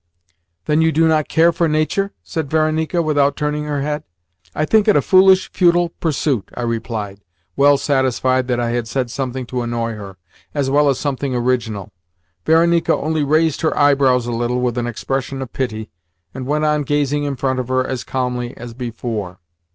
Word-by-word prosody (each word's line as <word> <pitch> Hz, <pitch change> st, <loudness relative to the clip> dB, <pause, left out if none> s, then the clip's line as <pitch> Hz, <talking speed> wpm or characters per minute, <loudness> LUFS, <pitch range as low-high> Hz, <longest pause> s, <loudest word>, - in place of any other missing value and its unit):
"Then 150 Hz, +1 st, +2 dB
you 160 Hz, 0 st, +3 dB
do 160 Hz, +1 st, +3 dB
not 155 Hz, -2 st, +2 dB
care 165 Hz, +1 st, +4 dB
for 170 Hz, 0 st, 0 dB
nature?" 155 Hz, +6 st, 0 dB
said 160 Hz, -6 st, -4 dB
Varenika 160 Hz, +2 st, +1 dB
without 145 Hz, -2 st, +2 dB
turning 150 Hz, 0 st, -2 dB
her 145 Hz, -2 st, -2 dB
head. 150 Hz, +1 st, -3 dB, 0.5 s
"I 155 Hz, -, 0 dB
think 215 Hz, +5 st, +3 dB
it 210 Hz, -, +5 dB
a -, -, +5 dB
foolish, 190 Hz, 0 st, +5 dB
futile 175 Hz, -2 st, +3 dB
pursuit," 145 Hz, -, -2 dB
I 120 Hz, -, -4 dB
replied, 115 Hz, -4 st, -3 dB, 0.4 s
well 140 Hz, 0 st, +5 dB
satisfied 130 Hz, -2 st, +1 dB
that 125 Hz, -1 st, 0 dB
I 120 Hz, -1 st, -1 dB
had 120 Hz, -1 st, -2 dB
said 125 Hz, 0 st, -2 dB
something 130 Hz, -1 st, -4 dB
to 125 Hz, +1 st, -3 dB
annoy 115 Hz, -1 st, -2 dB
her, 100 Hz, -3 st, -9 dB, 0.4 s
as 140 Hz, -2 st, 0 dB
well 145 Hz, +1 st, +4 dB
as 135 Hz, -, +1 dB
something 140 Hz, -2 st, -2 dB
original. 120 Hz, -5 st, -1 dB, 0.6 s
Varenika 170 Hz, +1 st, +3 dB
only 155 Hz, 0 st, -1 dB
raised 155 Hz, +2 st, +1 dB
her 160 Hz, -, 0 dB
eyebrows 135 Hz, -4 st, +3 dB
a 120 Hz, -, -3 dB
little, 120 Hz, +1 st, -1 dB
with 125 Hz, -1 st, -1 dB
an 120 Hz, -, -2 dB
expression 135 Hz, +3 st, -3 dB
of 130 Hz, -2 st, -7 dB
pity, 110 Hz, -7 st, -4 dB, 0.4 s
and 130 Hz, -1 st, -6 dB
went 150 Hz, +2 st, 0 dB
on 150 Hz, 0 st, +2 dB
gazing 145 Hz, 0 st, 0 dB
in 140 Hz, -1 st, -2 dB
front 130 Hz, 0 st, -1 dB
of 125 Hz, -, -3 dB
her 130 Hz, 0 st, +1 dB
as 130 Hz, -2 st, -4 dB
calmly 125 Hz, -1 st, -3 dB
as 120 Hz, 0 st, -8 dB
before. 115 Hz, -6 st, -5 dB
135 Hz, 185 wpm, -19 LUFS, 120-155 Hz, 0.6 s, it